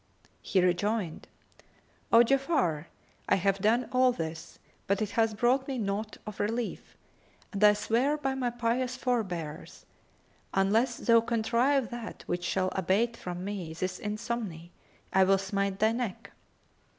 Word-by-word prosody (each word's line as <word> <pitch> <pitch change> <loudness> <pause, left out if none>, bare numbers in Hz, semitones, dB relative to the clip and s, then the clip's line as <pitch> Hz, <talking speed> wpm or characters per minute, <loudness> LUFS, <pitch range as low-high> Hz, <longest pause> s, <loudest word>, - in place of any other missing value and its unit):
'" - - -34
He 190 - +4
rejoined, 185 0 0 0.8
"O 230 +1 +8
Ja'afar 265 - +1 0.4
I - - +5
have 195 +1 +1
done 225 +4 +2
all 255 0 +4
this, 160 -6 -6 0.3
but 200 0 +1
it 215 -2 -2
hath 225 -2 +1
brought 255 +4 +2
me 270 -2 -3
naught 210 0 -3
of 210 -2 -8
relief, 225 +2 -3 0.6
and 200 +1 -1
I 210 0 +8
swear 245 +8 +1
by 270 -3 -1
my 260 -2 -1
pious 240 +2 -1
forbears 180 - -3 0.7
unless 220 +6 +2
thou 230 -1 +4
contrive 235 +3 +1
that 240 -2 -7
which 175 0 -2
shall 185 +1 0
abate 195 +6 +1
from 180 -4 -6
me 190 -6 -4
this 185 +2 -3
insomny, 210 -5 -4 0.4
I 190 - +6
will 195 +1 +4
smite 195 0 -1
thy 220 +2 +3
neck." 230 -4 -4
215 Hz, 145 wpm, -29 LUFS, 190-240 Hz, 0.8 s, O